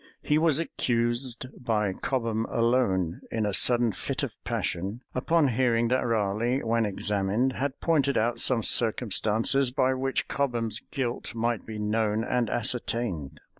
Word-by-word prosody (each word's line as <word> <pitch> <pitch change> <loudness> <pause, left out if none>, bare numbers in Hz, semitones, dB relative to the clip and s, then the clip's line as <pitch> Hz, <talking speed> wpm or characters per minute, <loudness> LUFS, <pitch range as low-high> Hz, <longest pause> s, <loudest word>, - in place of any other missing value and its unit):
He 150 0 +2
was 160 -3 +4
accused 120 -5 -1 0.2
by 105 -5 0
Cobham 115 -1 -1
alone, 115 -8 +1
in 110 -2 -1
a 105 - -1
sudden 120 +2 +3
fit 90 - -4
of - - -4
passion, 100 +8 -3
upon 150 +3 +2
hearing 120 -1 +2
that 130 +1 +2
Raleigh, 115 +4 0
when 115 -1 +1
examined, 105 +5 0
had 140 +1 -3
pointed 145 -4 +2
out 115 +2 +1
some 120 -4 +2
circumstances 115 +3 +2
by 130 +1 +1
which 135 +1 -1
Cobham's 120 -5 -1
guilt 125 -4 -3
might 115 -1 -1
be 110 -1 -6
known 105 +1 0
and 120 -1 0
ascertained. 110 - -2
115 Hz, 140 wpm, -27 LUFS, 110-130 Hz, 0.2 s, was